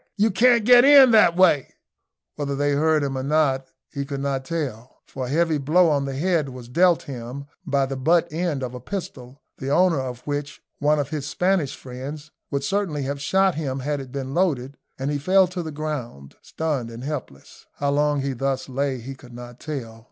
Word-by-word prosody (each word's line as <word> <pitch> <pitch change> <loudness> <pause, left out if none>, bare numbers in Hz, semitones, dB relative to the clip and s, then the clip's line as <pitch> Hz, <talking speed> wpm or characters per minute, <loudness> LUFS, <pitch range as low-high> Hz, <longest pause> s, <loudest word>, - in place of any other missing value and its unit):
you 215 +2 +3
can't 235 +3 +4
get 245 0 +8
in 275 -2 +8
that 210 -6 +5
way!" 170 -7 +3 0.6
Whether 140 -1 -3
they 145 +1 +1
heard 155 +1 +2
him 135 -1 -2
or 130 - -2
not 135 -2 +1 0.3
he 140 - -3
could 140 0 -5
not 135 -1 -2
tell, 130 -8 -5
for 130 -2 -6
a - - -7
heavy 160 +1 +1
blow 165 +5 +4
on 140 -2 +1
the 135 -1 -4
head 165 -3 +1
was 125 -2 -10
dealt 175 +6 +3
him 130 +1 -7 0.2
by 140 -2 +2
the 135 0 -4
butt 165 +5 +2
end 160 -5 -1
of 125 -1 -4
a 125 - -6
pistol, 130 - -7 0.2
the 135 - -4
owner 170 +1 +3
of 125 -2 -5
which, 145 0 -4 0.2
one 150 +1 +3
of 145 -2 -2
his 145 -2 -3
Spanish 180 -6 0
friends, 140 +4 -8 0.2
would 140 -1 -2
certainly 175 -5 -1
have 140 +1 -4
shot 190 +6 +2
him 140 -4 -3
had 145 +2 -2
it 130 -2 -9
been 135 -1 -5
loaded, 140 -7 0 0.2
and 135 +2 -2
he 145 - -1
fell 190 +6 +4
to 180 0 -5
the 160 - -5
ground, 140 - -6
stunned 145 -7 -3
and 115 +1 -9
helpless. 135 - -7
How 140 0 -1
long 145 0 +1
he 135 0 -2
thus 135 +1 -2
lay 135 0 -1
he 125 +3 -7
could 130 -2 -15
not 120 0 -10
tell. 125 -7 -6
140 Hz, 205 wpm, -23 LUFS, 130-160 Hz, 0.6 s, get